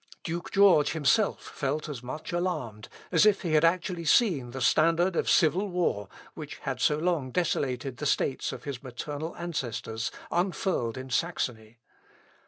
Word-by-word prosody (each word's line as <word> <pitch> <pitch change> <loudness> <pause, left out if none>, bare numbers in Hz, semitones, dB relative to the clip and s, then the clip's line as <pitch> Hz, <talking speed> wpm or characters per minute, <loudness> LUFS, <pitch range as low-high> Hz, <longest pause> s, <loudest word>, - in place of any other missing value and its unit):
Duke 170 0 -4
George 195 -8 +5
himself 195 +7 +2
felt 150 +3 -3
as 140 -6 -6
much 130 +5 -6
alarmed, 150 - -3 0.2
as - - +5
if 210 -2 +4
he 165 -3 -1
had 155 0 +4
actually 170 0 +1
seen 155 - +3
the 130 +2 -6
standard 165 +7 +3
of - - 0
civil 185 +4 +3
war, 165 - -1 0.2
which 150 -2 -8
had 130 -3 -4
so 150 - +3
long 160 -5 0
desolated 135 -5 -1
the 150 - -2
states 135 -1 0
of - - -8
his 140 -3 -5
maternal 145 +5 -6
ancestors, 120 -8 -3 0.2
unfurled 175 - -1
in 130 0 -7
Saxony. 120 -9 -2
150 Hz, 155 wpm, -28 LUFS, 130-175 Hz, 0.2 s, George